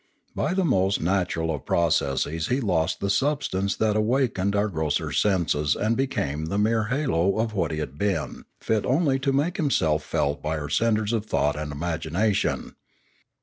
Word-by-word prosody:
By 180 - -1
the 190 -1 +1
most 95 - +2
natural 85 -2 0
of 75 - -7
processes 80 -1 +1
he 125 - +1
lost 90 - 0
the 100 - -1
substance 135 -7 0
that 110 -1 +1
awakened 110 -3 +1
our 105 +1 +2
grosser 80 -6 -1
senses 85 -7 +1
and 110 +2 0
became 80 - -1
the 95 +5 -2
mere 110 +1 +2
halo 110 - +1
of 110 0 -1
what 90 -6 0
he 80 - -3
had 75 -2 -5
been, 100 -2 -2
fit 110 -2 0
only 135 0 +2
to 135 +1 0
make 145 +7 0
himself 80 - +1
felt 70 0 -1
by 80 +1 -2
our 75 -1 -5
centres 110 +4 +1
of 110 -2 -1
thought 75 -7 +1
and 75 0 -4
imagination. 85 +6 -1
100 Hz, 170 wpm, -25 LUFS, 80-115 Hz, -, most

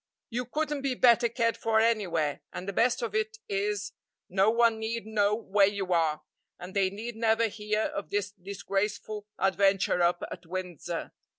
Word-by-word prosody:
You 245 +2 -2
couldn't 295 +3 -2
be 270 -2 -1
better 240 -1 +5
cared 230 -1 0
for 220 -1 +2
anywhere, 180 -10 +1
and 185 - -7
the 200 - -3
best 240 +4 +2
of 225 -3 -3
it 220 0 -1
is, 205 +1 -1 0.4
no 195 +3 +3
one 230 -1 +3
need 220 0 -3
know 210 -1 +2
where 205 -2 +3
you 195 -2 -1
are, 155 -2 +1 0.3
and 180 +2 -9
they 195 -1 +3
need 220 +4 -6
never 225 0 +2
hear 210 0 -1
of 200 - -4
this 205 0 -1
disgraceful 200 +2 -3
adventure 195 -1 +2
up 175 0 +2
at 170 - -8
Windsor. 175 -2 -5
205 Hz, 170 wpm, -29 LUFS, 190-225 Hz, 0.4 s, better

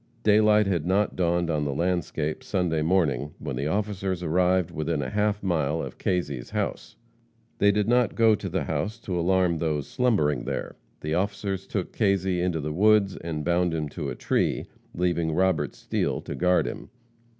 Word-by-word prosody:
Daylight 105 0 +5
had 90 -5 0
not 100 +2 +1
dawned 85 -1 +1
on 75 -2 0
the 70 -2 -2
landscape 85 -3 -1
Sunday 90 -5 0
morning 75 -5 +1
when - - -5
the 70 +4 -2
officers 95 -1 -2
arrived 90 +1 +2
within 80 -1 -2
a - - -4
half 105 0 0
mile 80 -4 0
of - - -6
Kazy's 75 -9 -2
house. - - -3 0.6
They 100 0 +5
did 105 0 0
not 120 +1 +2
go 115 -1 +5
to 100 -2 -3
the 95 +2 -1
house 80 +9 -2
to 95 -4 -4
alarm 90 -1 +2
those 75 -3 -1
slumbering 85 - +1
there. - - -4 0.3
The 75 +1 -2
officers 95 +1 -2
took 95 -4 -3
Kazy 95 -4 +1
into 90 -2 0
the 75 +1 -3
woods 100 +1 +4
and 80 -3 -5
bound 85 0 +1
him 75 -2 -2
to - - -5
a - - -4
tree, - - 0 0.3
leaving 85 -2 0
Robert 85 -7 +1
Steele - - -1
to - - -6
guard 90 0 +2
him. - - -6
90 Hz, 175 wpm, -26 LUFS, 80-100 Hz, 0.6 s, Daylight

